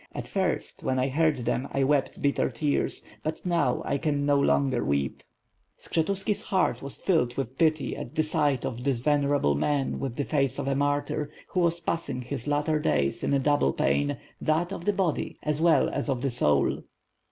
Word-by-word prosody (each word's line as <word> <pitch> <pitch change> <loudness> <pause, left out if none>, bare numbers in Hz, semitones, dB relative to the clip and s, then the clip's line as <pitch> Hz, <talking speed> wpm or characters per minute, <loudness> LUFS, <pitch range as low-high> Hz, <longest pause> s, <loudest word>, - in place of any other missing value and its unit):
At - - -5
first, - - -2
when 130 0 0
I 130 +1 +1
heard 155 +1 +2
them 125 +3 -1
I 135 - +2
wept 140 0 0
bitter 140 0 +2
tears; 140 +4 -1 0.2
but 155 +3 -4
now 170 -8 +1
I 140 - 0
can 145 -3 0
no 145 -1 +3
longer 135 -3 +2
weep." 70 -1 -1 0.6
Skshetufiki's 195 +5 -1
heart 185 -11 0
was 140 0 -4
filled 140 -10 +1
w^ith 130 -1 -3
pity 155 -3 +2
at - - -8
the 155 - +2
sight 150 -4 +1
of 120 +1 -4
this 135 -2 +1
venerable 145 - +2
man, 135 - 0
with 130 -3 -3
the 145 - -2
face 135 -3 +1
of 140 -1 -3
a 140 - +2
martyr, 145 +1 0 0.2
who 185 - -1
was 170 -1 +2
passing 165 -7 -2
his 120 +1 -5
latter 150 +1 +1
days 70 - 0
in - - 0
a 140 - +4
double 135 - +2
pain, 70 +1 +1 0.2
that 170 +4 +1
of 170 - -7
the 205 - +2
body 190 -5 -1
as 150 0 0
well 165 -2 +4
as - - -2
the 135 0 0
soul. 75 - +2
145 Hz, 190 wpm, -27 LUFS, 130-155 Hz, 0.6 s, a